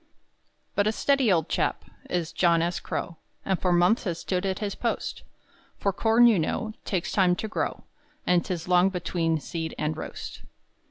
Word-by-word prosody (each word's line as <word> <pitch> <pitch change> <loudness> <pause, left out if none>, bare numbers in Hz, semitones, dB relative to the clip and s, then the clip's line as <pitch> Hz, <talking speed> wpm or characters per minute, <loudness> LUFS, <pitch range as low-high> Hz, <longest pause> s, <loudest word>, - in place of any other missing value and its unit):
But 205 0 +2
a - - +3
steady 270 0 +2
old 165 -4 +2
chap - - -1 0.2
Is 170 -3 -1
John 170 -2 +3
S. 175 +1 -1
Crow, 170 - -4 0.3
And 190 -2 0
for 180 - +2
months 175 +7 +3
has 170 -4 -1
stood 185 +2 -2
at 190 -1 -1
his 205 -2 -3
post; 235 - -3 0.6
For 200 - 0
corn 225 +4 +4
you 225 -6 +5
know 220 +7 -2
Takes 185 -4 -1
time 185 -3 +3
to 220 - -4
grow, 215 - -3 0.4
And 180 -1 +3
'tis 175 -2 -4
long 180 +1 +5
between 165 -3 -1
seed 160 +1 -5
and 155 +1 -1
roast. - - -7
180 Hz, 175 wpm, -26 LUFS, 170-205 Hz, 0.6 s, you